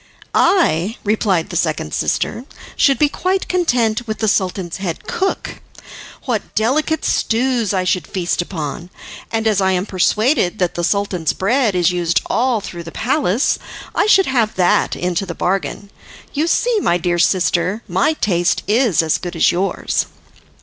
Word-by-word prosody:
"I," 220 - +2
replied 205 -4 0
the - - -6
second 155 - -1
sister, 240 - -1 0.3
"should 275 -2 +3
be 300 - +4
quite 370 +6 -1
content 240 -10 +1
with 215 - -3
the 220 - -1
Sultan's 185 -3 -1
head 185 -4 -5
cook. 385 +1 -3 0.6
What 235 -6 -3
delicate 300 +8 +1
stews 235 -2 +1
I 190 -2 0
should 180 -3 0
feast 175 -2 -1
upon! 170 -1 -5 0.4
And, 225 0 -1
as 210 -3 +2
I 190 0 +2
am 180 +1 0
persuaded 210 - +1
that 180 -3 0
the 175 - -3
Sultan's 185 -4 0
bread 225 +1 +1
is 175 0 +3
used 175 -1 +1
all 240 -2 +1
through 175 -3 -7
the 165 - -8
palace, 250 - 0 0.3
I - - +2
should 390 -3 +5
have 235 -5 0
that 180 -1 +2
into 180 +2 -2
the 170 - -5
bargain. 195 +2 -2 0.4
You 300 +3 0
see, 470 +5 +2
my 175 - +2
dear 175 0 -1
sister, 180 +4 +1
my 195 - +1
taste 175 - 0
is 215 - +3
as 160 - +1
good 175 -1 -6
as 165 - +4
yours." 190 +3 -1
200 Hz, 160 wpm, -18 LUFS, 175-245 Hz, 0.6 s, should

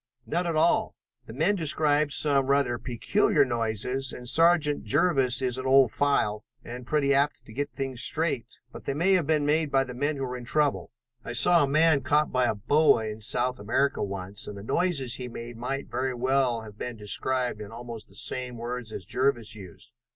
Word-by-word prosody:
"None 175 +2 -1
at 165 - -1
all. 160 +2 +2 0.3
The 110 - -9
men 160 - +1
describe 150 -3 +2
some 140 -2 +2
rather 140 -4 +1
peculiar 145 - +1
noises 120 +2 -1
and 125 - -9
Sergeant 160 +1 +3
Jervis 130 - +2
is 130 0 0
an 130 - -4
old 135 -3 +5
file 105 -7 0 0.2
and 120 +1 -9
pretty 140 -2 +1
apt 140 +2 0
to 110 - -13
get 145 +4 -3
things 135 -3 -4
straight, 155 -7 0 0.2
but - - -11
they 135 - -2
may 180 +6 +2
have 175 -6 +1
been 155 -2 +1
made 155 +1 +1
by 135 -1 +3
the 125 -1 -8
men 145 +4 -1
who 135 - -3
were 125 0 -5
in 125 - -9
trouble. 145 +3 0 0.3
I - - -6
saw 165 +7 +4
a - - +1
man 155 0 +3
caught 150 +2 +1
by 125 -1 +2
a 110 - -1
boa 145 +2 +3
in 105 +1 -7
South 125 +4 -1
America 115 +7 0
once, 100 0 -4
and 105 - -7
the 100 - -9
noises 135 - 0
he 125 - -6
made 120 0 -8
might 135 +4 -4
very 130 +1 -2
well 130 -1 +1
have 105 -1 -13
been 120 -2 -5
described 120 +2 -1
in 105 0 -9
almost 115 -2 -8
the - - -18
same 125 0 -3
words 120 -1 -5
as 95 - -7
Jervis 120 -1 0
used." 105 +2 -10
130 Hz, 200 wpm, -26 LUFS, 115-145 Hz, 0.3 s, old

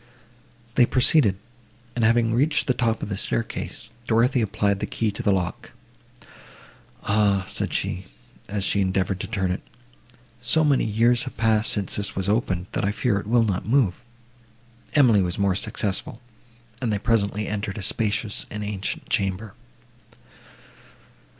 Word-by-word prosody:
They 120 -1 +4
proceeded, 125 -6 +5 0.6
and, 120 - 0
having 115 0 +3
reached 145 +6 +2
the 130 - +2
top 115 -2 -1
of - - -4
the 100 - -2
staircase, 110 +1 -4 0.2
Dorothée 120 +3 +3
applied 100 -1 0
the - - -3
key 110 -2 -1
to - - -6
the 100 - +2
lock. 90 -2 -3 1.3
"Ah," 100 -2 +2
said - - -2
she, 95 +1 -2 0.4
as 100 0 -2
she 100 +1 +2
endeavoured 95 0 0
to - - -5
turn 95 -5 -1
it, 90 - -3 0.8
"so 125 +7 +3
many 145 -3 +2
years 115 +3 +2
have 130 - -8
passed 110 -1 +2
since 100 -2 -1
this 100 -1 -2
was 95 0 -2
opened, 100 -4 0
that - - -2
I 100 - +1
fear 110 -1 0
it 100 - -9
will 120 +1 +3
not 100 -4 -2
move." 115 -7 +2 0.9
Emily 120 -9 +5
was 90 -2 -1
more 100 -1 +2
successful, 100 +3 -2 0.6
and 120 -3 0
they 105 - +1
presently 105 -1 0
entered 105 -1 -4
a 100 - -4
spacious 105 +1 0
and 105 0 -5
ancient 100 -2 -4
chamber. 95 +2 -1
105 Hz, 155 wpm, -24 LUFS, 100-115 Hz, 1.3 s, proceeded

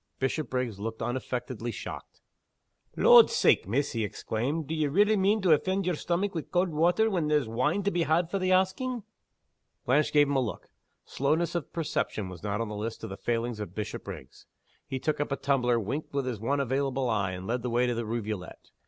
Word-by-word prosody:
Bishopriggs 130 -5 -2
looked 110 +2 -4
unaffectedly 120 -1 -3
shocked. - - -8 0.8
"Lord's - - +8
sake, - - +4
miss," 135 +8 0
he 115 -2 -1
exclaimed 125 +9 -2
"d'ye 155 0 0
relly 205 +8 +4
mean 200 +1 +2
to 180 - +4
offend 190 +5 +2
yer 180 - +1
stomach 175 +5 -1
wi' 165 - -2
cauld 180 +4 0
water 170 +7 +3
when 180 -8 0
there's 150 -5 +2
wine 125 - 0
to 200 - +1
be 175 - 0
had 165 +2 +2
for 195 - 0
the 185 0 0
asking!" 195 +6 +1 0.8
Blanche 145 +4 +3
gave 145 -1 +5
him 140 - 0
a 135 - +3
look. 120 - -5 0.4
Slowness 155 +5 0
of 170 -4 -3
perception 125 - -2
was 90 -3 -9
not 105 0 -2
on 115 - -2
the 105 - -5
list 110 +2 -5
of 110 - -5
the - - -4
failings 120 -1 -2
of 100 -3 -6
Bishopriggs. 105 -10 -7 0.4
He 135 - -3
took 150 +3 -1
up 145 - -2
a - - +2
tumbler, 125 -4 +1
winked 140 +8 -4
with 140 -2 0
his 125 -5 -3
one 140 +6 0
available 135 0 0
eye, 100 -5 0
and 90 +1 -6
led 120 +4 -1
the 125 - -3
way 120 +1 +2
to 120 - 0
the 115 0 -2
rivulet. 105 -5 -5
135 Hz, 205 wpm, -28 LUFS, 115-165 Hz, 0.8 s, Lord's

